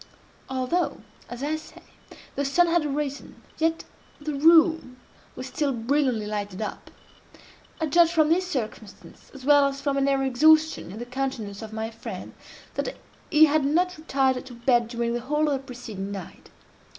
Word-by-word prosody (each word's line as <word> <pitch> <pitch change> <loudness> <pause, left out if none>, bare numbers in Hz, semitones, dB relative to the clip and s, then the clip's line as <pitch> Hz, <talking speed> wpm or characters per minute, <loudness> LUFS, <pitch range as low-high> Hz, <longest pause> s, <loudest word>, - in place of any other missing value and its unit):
Although, 265 +7 -1 0.3
as 245 +2 -7
I 305 +2 0
say, 310 - -14 0.5
the 280 - -2
sun 285 +6 +3
had 340 -1 +2
arisen, 285 0 -4 0.2
yet 325 0 +1 0.4
the 300 0 -4
room 320 -2 +4 0.4
was 255 - -6
still 280 +2 -1
brilliantly 250 -2 0
lighted 205 -2 -4
up. 215 - -5 0.9
I 320 - 0
judge 335 +2 +4
from 315 -3 +3
this 365 +3 +2
circumstance, 220 - -6
as 265 -1 -10
well 285 -1 +6
as 275 0 -4
from 280 -1 -1
an 275 0 +2
air 275 -1 +2
of - - +1
exhaustion 310 - +4
in 200 - -8
the 240 - -5
countenance 245 -6 -4
of 220 -1 -8
my 220 +1 -4
friend, 225 +1 -8 0.4
that - - -3 0.3
he 310 0 +7
had 305 -1 +2
not 355 +6 +1
retired 265 -4 0
to 245 - -10
bed 240 -1 +2
during 235 0 -2
the 240 - -1
whole 300 +5 0
of 290 - +1
the 270 - -1
preceding 220 -6 -7
night. 195 -3 -9
275 Hz, 175 wpm, -25 LUFS, 235-310 Hz, 0.9 s, he